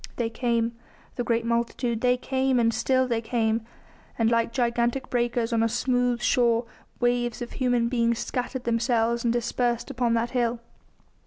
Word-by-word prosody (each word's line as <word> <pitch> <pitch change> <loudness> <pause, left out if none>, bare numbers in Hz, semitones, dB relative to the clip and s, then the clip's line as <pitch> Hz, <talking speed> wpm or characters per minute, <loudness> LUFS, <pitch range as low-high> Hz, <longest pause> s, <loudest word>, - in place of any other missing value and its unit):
They 230 -2 -2
came 230 -1 0 0.4
the 245 - -2
great 230 -1 0
multitude 235 0 -1
they 250 0 +3
came, 265 0 0
and 230 -1 +2
still 260 +1 +1
they 230 -2 0
came; 225 -1 0 0.6
and 225 0 +2
like 230 0 +2
gigantic 240 +1 0
breakers 240 -1 0
on 225 - +2
a 230 - +2
smooth 245 0 0
shore, 235 -2 +3 0.3
waves 240 -1 0
of 240 - -6
human 245 -3 +1
beings 235 -1 +1
scattered 250 +1 -3
themselves 235 0 +1
and 235 - +2
dispersed 240 +1 -1
upon 245 -3 +1
that 230 +1 -1
hill. 240 -2 0
235 Hz, 160 wpm, -26 LUFS, 230-245 Hz, 0.6 s, they